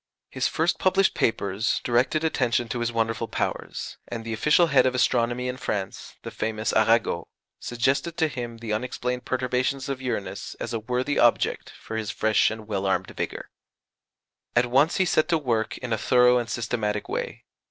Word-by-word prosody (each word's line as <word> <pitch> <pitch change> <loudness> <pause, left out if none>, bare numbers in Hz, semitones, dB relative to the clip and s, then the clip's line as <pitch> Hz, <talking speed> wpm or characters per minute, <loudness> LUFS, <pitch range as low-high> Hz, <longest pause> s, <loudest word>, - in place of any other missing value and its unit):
His - - 0
first 165 +2 0
published 190 +1 +3
papers 105 0 0
directed 125 +6 +1
attention 125 -6 +1
to 120 - -2
his 120 0 -1
wonderful 115 0 -1
powers; - - -4
and 115 -1 -6
the 115 - -3
official 150 +10 +4
head 140 -5 +4
of 130 - 0
astronomy 125 0 +1
in 125 0 -3
France, 100 -6 -4
the - - -6
famous 110 -1 -2
Arago, 110 -5 +2 0.3
suggested 135 +8 -1
to 160 - +3
him 120 -5 -6
the 115 -2 -4
unexplained 125 +2 -3
perturbations 130 +2 -1
of 135 -1 -3
Uranus 125 -6 -4
as - - -4
a 115 - -1
worthy 125 +5 -1
object 120 - +2
for 110 - -6
his 110 -2 -3
fresh 110 0 +2
and 110 -1 -7
well 100 -2 -1
armed 95 - 0
vigour. - - -5 1.0
At 120 +1 +4
once 135 +7 +3
he 190 - +3
set 160 -1 +2
to 165 - +3
work 115 -7 -1
in 125 -3 -3
a 110 - -1
thorough 125 0 +5
and 120 -1 -4
systematic 110 -3 -2
way. - - -4
120 Hz, 175 wpm, -25 LUFS, 110-130 Hz, 1.0 s, thorough